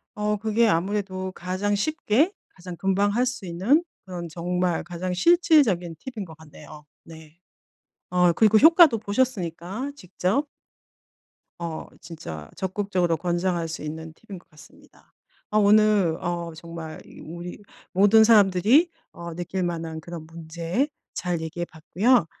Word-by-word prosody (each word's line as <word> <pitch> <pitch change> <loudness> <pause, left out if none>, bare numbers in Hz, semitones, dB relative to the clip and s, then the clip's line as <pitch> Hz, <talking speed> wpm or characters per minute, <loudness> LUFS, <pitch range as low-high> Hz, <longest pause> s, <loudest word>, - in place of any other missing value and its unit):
어 210 0 0
그게 220 +2 +2
아무래도 190 0 -1
가장 185 +3 -2
쉽게 305 - +1 0.2
가장 180 -1 -10
금방 195 +2 +1
할 245 +2 +2
수 245 -6 -4
있는 215 - +2 0.2
그런 175 -2 -6
정말 175 +1 -1
가장 175 +2 -5
실질적인 240 - +3 0.2
팁인 215 -4 -5
것 160 -3 -13
같네요. 150 -1 -14 0.2
네. 160 0 -14 0.7
어 180 -1 +4
그리고 215 +3 +5
효과도 320 - +7
보셨으니까 205 - -2
직접. 195 - -1 1.1
어 165 -2 -5 0.2
진짜 80 - -8
적극적으로 185 -3 -1
권장할 175 -1 -1
수 160 - -6
있는 160 +1 -7
팁인 190 +3 -11
것 - - -29
같습니다. 150 -2 -20 0.4
아 215 - 0
오늘 205 -5 +4
어 170 -1 -3
정말 165 -1 -8
이 - - -15
우리 175 +4 -8 0.3
모든 205 +4 +6
사람들이 215 - +5 0.2
어 170 -1 -8
느낄 180 +2 -3
만한 165 -2 -4
그런 170 -1 -8
문제 165 - -3 0.3
잘 175 -2 -2
얘기해 170 +2 -4
봤고요. 190 +8 +1
180 Hz, 275 characters per minute, -24 LUFS, 170-210 Hz, 1.1 s, 효과도